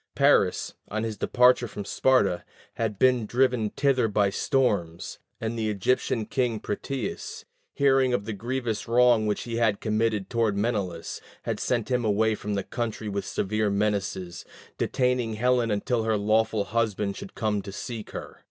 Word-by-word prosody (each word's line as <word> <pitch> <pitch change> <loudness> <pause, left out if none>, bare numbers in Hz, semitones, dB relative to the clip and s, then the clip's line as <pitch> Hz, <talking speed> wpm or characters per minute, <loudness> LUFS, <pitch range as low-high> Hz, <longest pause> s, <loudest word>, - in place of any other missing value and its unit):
Paris, - - +3
on 110 +1 -3
his 110 -1 -3
departure 125 +4 +4
from 105 -2 -7
Sparta, 115 -10 +2 0.3
had 110 -3 -2
been 125 -1 +3
driven 125 -3 +2
thither 130 -1 +2
by 100 -2 +2
storms, 100 -9 0 0.2
and 115 0 -3
the 110 -1 0
Egyptian 110 +2 0
king 120 -4 -1
Proteus, 110 +3 -4 0.3
hearing 135 -2 +3
of 100 -5 0
the 110 - -3
grievous 120 0 -3
wrong 120 -2 +4
which 105 - -1
he 115 -1 -4
had 110 -3 +2
committed 110 -2 0
toward 115 -4 0
Menelaus, 100 -6 -2 0.2
had - - -2
sent 120 0 -1
him 125 -1 +1
away 110 +1 +2
from 105 -1 -3
the 100 - -1
country 115 -3 -4
with 100 -1 -3
severe 105 +2 0
menaces, 100 -4 -1 0.4
detaining 125 -3 0
Helen 120 +1 +2
until 115 +3 0
her 110 -1 +1
lawful 110 +1 +2
husband 105 -1 -1
should - - -9
come 105 -2 0
to 100 0 -8
seek 110 +2 -6
her. - - -8
110 Hz, 160 wpm, -26 LUFS, 105-120 Hz, 0.4 s, departure